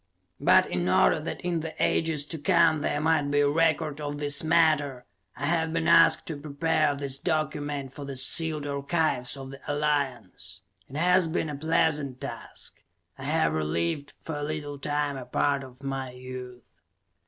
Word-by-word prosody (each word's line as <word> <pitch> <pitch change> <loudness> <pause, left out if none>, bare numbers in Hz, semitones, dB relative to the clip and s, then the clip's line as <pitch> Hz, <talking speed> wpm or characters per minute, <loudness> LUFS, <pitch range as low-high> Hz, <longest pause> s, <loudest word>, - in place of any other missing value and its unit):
But, - - +5
in 90 0 -2
order 95 - +4
that 155 - -5
in 175 -2 -1
the 160 0 -6
ages 160 -3 +2
to 160 +1 -5
come 155 +1 +3
there 145 - -1
might 155 -2 +2
be 145 0 +2
a 145 - +3
record 155 -1 +1
of 145 0 -4
this 145 0 0
matter, 155 -6 +2 0.3
I 145 - -3
have 160 +1 +1
been 165 -1 0
asked 165 0 +6
to 160 - -4
prepare 155 0 +1
this 140 -1 -3
document 145 -3 -2
for 145 - -8
the 140 -1 -6
sealed 155 +3 +2
archives 140 -2 -1
of 135 0 -8
the 135 - -11
Alliance. 130 -11 -2 0.3
It 135 - -10
has 180 +2 +3
been 160 -1 -2
a - - -5
pleasant 150 -3 0
task; - - -9 0.4
I - - -7
have 80 0 +1
relived, 85 - -2
for 160 -2 -4
a 145 - -4
little 145 -1 -4
time, 145 0 -1
a 130 - -7
part 140 +2 0
of 130 +1 -13
my 135 -1 -3
youth. 125 -1 -9
145 Hz, 175 wpm, -27 LUFS, 135-155 Hz, 0.4 s, asked